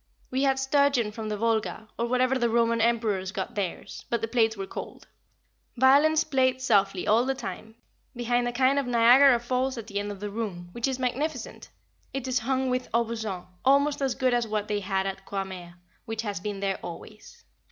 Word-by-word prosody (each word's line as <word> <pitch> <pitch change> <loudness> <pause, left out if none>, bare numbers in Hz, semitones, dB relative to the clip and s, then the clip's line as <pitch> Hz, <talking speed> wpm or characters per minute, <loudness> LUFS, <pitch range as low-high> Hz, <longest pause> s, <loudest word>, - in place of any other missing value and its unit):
We 260 +1 0
had 270 -1 +2
sturgeon 270 -4 +2
from 215 0 -6
the 210 - -2
Volga, 220 0 -1
or 235 - -1
wherever 255 +1 +2
the 240 -1 +2
Roman 230 0 +2
emperors 220 -5 +1
got 190 -1 -4
theirs, 195 -4 -5
but 235 - 0
the 225 - -2
plates 225 -2 +1
were 195 - -4
cold. - - -8 0.7
Violins 285 +5 +5
played 260 -3 +1
softly 200 -7 +2
all 225 +3 +4
the 270 +1 -1
time, 220 0 -7 0.4
behind 240 0 0
a - - -1
kind 260 +3 +3
of 275 - -3
Niagara 245 +2 +6
Falls 255 +2 -1
at 230 - -6
the 205 -2 -3
end 205 0 -4
of 200 - -8
the 205 0 -5
room, 195 -5 -5
which 235 +6 -2
is 265 -1 -2
magnificent; 260 +1 -3 0.5
it 270 -1 -3
is 255 -1 +1
hung 260 +2 0
with 250 0 -2
aubusson, 220 -5 -2 0.2
almost 280 +2 +3
as 270 -2 0
good 260 -2 +1
as 240 -1 +1
what 210 -1 -2
they 210 -1 -1
had 195 -1 -1
at 195 0 -4
Croixmare, 190 -3 -6 0.3
which 225 0 -4
has 205 -5 -3
been 200 +1 -5
there 195 -1 -1
always. 215 - -11
235 Hz, 195 wpm, -27 LUFS, 205-260 Hz, 0.7 s, Niagara